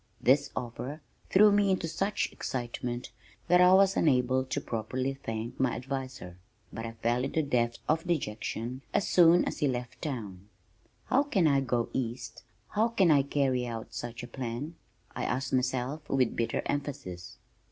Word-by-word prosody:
This 140 Hz, +2 st, +3 dB
offer 125 Hz, +4 st, -5 dB, 0.3 s
threw 210 Hz, +2 st, +7 dB
me 200 Hz, -1 st, +3 dB
into 185 Hz, -3 st, +1 dB
such 195 Hz, +6 st, -1 dB
excitement 120 Hz, -1 st, -4 dB, 0.4 s
that 180 Hz, 0 st, +5 dB
I 180 Hz, 0 st, +7 dB
was 195 Hz, 0 st, +5 dB
unable 130 Hz, -3 st, +3 dB
to 130 Hz, +2 st, -2 dB
properly 130 Hz, +2 st, -2 dB
thank 115 Hz, -3 st, -5 dB
my 130 Hz, -2 st, +2 dB
adviser, 130 Hz, -8 st, -5 dB, 0.4 s
but 115 Hz, 0 st, -4 dB
I 115 Hz, -, -7 dB
fell 120 Hz, +2 st, 0 dB
into 155 Hz, +4 st, 0 dB
depths 120 Hz, -4 st, 0 dB
of 160 Hz, +3 st, +1 dB
dejection 125 Hz, -4 st, -2 dB
as 200 Hz, -, +2 dB
soon 175 Hz, 0 st, +6 dB
as -, -, -3 dB
he 150 Hz, -, +2 dB
left 125 Hz, -2 st, -4 dB
town. 105 Hz, -, -5 dB, 0.6 s
"How 270 Hz, -, +3 dB
can 225 Hz, -, +1 dB
I 140 Hz, -3 st, +4 dB
go 120 Hz, -3 st, 0 dB
east? 120 Hz, -2 st, -4 dB, 0.3 s
How 220 Hz, +2 st, +2 dB
can 195 Hz, -7 st, +3 dB
I 145 Hz, -2 st, +6 dB
carry 135 Hz, -3 st, 0 dB
out 115 Hz, -1 st, -6 dB
such 120 Hz, +1 st, -6 dB
a -, -, -6 dB
plan?" 125 Hz, +5 st, -5 dB, 0.4 s
I -, -, -3 dB
asked 130 Hz, +1 st, -2 dB
myself 130 Hz, +3 st, -1 dB
with 130 Hz, -3 st, +2 dB
bitter 115 Hz, -, -1 dB
emphasis. 125 Hz, -12 st, -4 dB
130 Hz, 165 wpm, -29 LUFS, 120-155 Hz, 0.6 s, threw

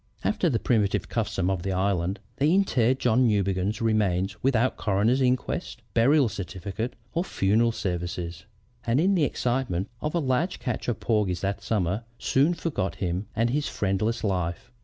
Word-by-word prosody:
"After 185 Hz, -5 st, +1 dB
the 120 Hz, -, +1 dB
primitive 110 Hz, -4 st, +1 dB
custom 105 Hz, -5 st, -1 dB
of 95 Hz, -3 st, -1 dB
the 95 Hz, +2 st, -2 dB
island, 95 Hz, 0 st, 0 dB, 0.2 s
they 145 Hz, +3 st, +3 dB
interred 130 Hz, -, +3 dB
John 125 Hz, 0 st, +3 dB
Newbegin's 100 Hz, 0 st, 0 dB
remains 100 Hz, -3 st, +1 dB
without 130 Hz, -1 st, +2 dB
coroner's 105 Hz, +6 st, +1 dB
inquest, 125 Hz, 0 st, -1 dB
burial 135 Hz, +4 st, +4 dB
certificate, 100 Hz, +3 st, -5 dB, 0.2 s
or 170 Hz, -, +1 dB
funeral 115 Hz, -, +2 dB
services, 90 Hz, -3 st, -4 dB, 0.4 s
and 115 Hz, +4 st, +3 dB
in 190 Hz, +5 st, +3 dB
the 170 Hz, -6 st, +3 dB
excitement 120 Hz, -8 st, -1 dB
of 150 Hz, +2 st, -2 dB
a -, -, +3 dB
large 150 Hz, +5 st, 0 dB
catch 125 Hz, -3 st, -4 dB
of 120 Hz, -, -1 dB
porgies 105 Hz, -6 st, 0 dB
that 100 Hz, 0 st, -2 dB
summer, 105 Hz, 0 st, -1 dB
soon 145 Hz, +6 st, +2 dB
forgot 145 Hz, -, -2 dB
him 90 Hz, +2 st, -2 dB
and 115 Hz, +1 st, +1 dB
his 145 Hz, +2 st, 0 dB
friendless 105 Hz, +3 st, -1 dB
life. 90 Hz, +2 st, -2 dB
110 Hz, 160 wpm, -26 LUFS, 95-130 Hz, 0.4 s, burial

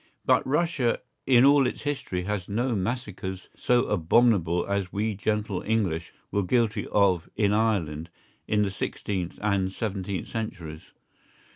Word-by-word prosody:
But -, -, +3 dB
Russia 150 Hz, -4 st, +1 dB, 0.3 s
in 125 Hz, -1 st, +6 dB
all 140 Hz, -2 st, +6 dB
its -, -, -5 dB
history 135 Hz, -11 st, -2 dB
has 100 Hz, -1 st, -3 dB
no 120 Hz, +4 st, 0 dB
massacres 95 Hz, -3 st, -4 dB
so 125 Hz, 0 st, +2 dB
abominable 90 Hz, -2 st, +3 dB
as 100 Hz, -2 st, -2 dB
we 110 Hz, +2 st, -1 dB
gentle 105 Hz, -1 st, -1 dB
English 95 Hz, -7 st, -1 dB, 0.2 s
were 100 Hz, -, +1 dB
guilty 110 Hz, +3 st, +1 dB
of 95 Hz, -5 st, +2 dB
in 105 Hz, -1 st, +2 dB
Ireland 90 Hz, -8 st, 0 dB, 0.4 s
in 105 Hz, -1 st, +2 dB
the 100 Hz, -, -1 dB
sixteenth 95 Hz, -2 st, -3 dB
and 100 Hz, -3 st, +1 dB
seventeenth 100 Hz, -2 st, -3 dB
centuries. 90 Hz, -9 st, -6 dB
105 Hz, 135 wpm, -26 LUFS, 95-115 Hz, 0.4 s, in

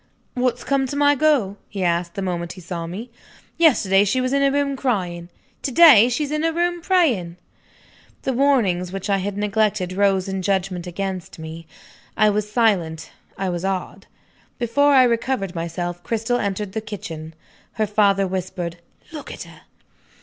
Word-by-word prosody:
"What's 250 Hz, -1 st, -1 dB
come 275 Hz, -1 st, +1 dB
to 280 Hz, -, -5 dB
my 290 Hz, 0 st, +4 dB
girl?" 275 Hz, -9 st, +2 dB
he 195 Hz, -2 st, -4 dB
asked, 170 Hz, 0 st, 0 dB
the 195 Hz, -, -3 dB
moment 175 Hz, -2 st, -3 dB
he 185 Hz, -, -12 dB
saw 170 Hz, -1 st, -5 dB
me. 215 Hz, +8 st, -7 dB, 0.5 s
"Yesterday 205 Hz, -, +4 dB
she 210 Hz, +6 st, +1 dB
was 255 Hz, +1 st, -1 dB
in 280 Hz, -, +2 dB
her 275 Hz, -, +4 dB
room, 280 Hz, 0 st, 0 dB
crying. 180 Hz, -10 st, -2 dB, 0.3 s
To 275 Hz, -, -2 dB
day 260 Hz, -7 st, +8 dB
she's 290 Hz, +4 st, -2 dB
in 305 Hz, 0 st, -1 dB
her 330 Hz, 0 st, +1 dB
room, 345 Hz, +1 st, -1 dB
praying." 255 Hz, -, +1 dB, 0.9 s
The 265 Hz, -, -1 dB
warnings 230 Hz, -10 st, +2 dB
which 195 Hz, +1 st, -4 dB
I 195 Hz, -, +3 dB
had 200 Hz, +1 st, -4 dB
neglected 205 Hz, -2 st, 0 dB
rose 195 Hz, -1 st, +2 dB
in 190 Hz, 0 st, -3 dB
judgment 185 Hz, -2 st, -1 dB
against 190 Hz, 0 st, -5 dB
me. 160 Hz, 0 st, -9 dB, 0.5 s
I 215 Hz, 0 st, +4 dB
was 210 Hz, 0 st, -2 dB
silent; 195 Hz, -9 st, +1 dB, 0.3 s
I 190 Hz, -1 st, -2 dB
was 175 Hz, 0 st, -3 dB
awed. 190 Hz, -1 st, -3 dB, 0.5 s
Before 285 Hz, +5 st, +2 dB
I 260 Hz, -, +7 dB
recovered 235 Hz, -5 st, 0 dB
myself, 175 Hz, +1 st, -4 dB
Cristel 230 Hz, +4 st, -1 dB
entered 200 Hz, 0 st, -2 dB
the 220 Hz, -, -3 dB
kitchen. 165 Hz, -7 st, -8 dB, 0.4 s
Her 215 Hz, -, 0 dB
father 200 Hz, -1 st, +2 dB
whispered, 180 Hz, -2 st, -4 dB, 0.3 s
"Look 305 Hz, -2 st, -8 dB
at -, -, -7 dB
her!" -, -, -15 dB
200 Hz, 170 wpm, -22 LUFS, 180-255 Hz, 0.9 s, day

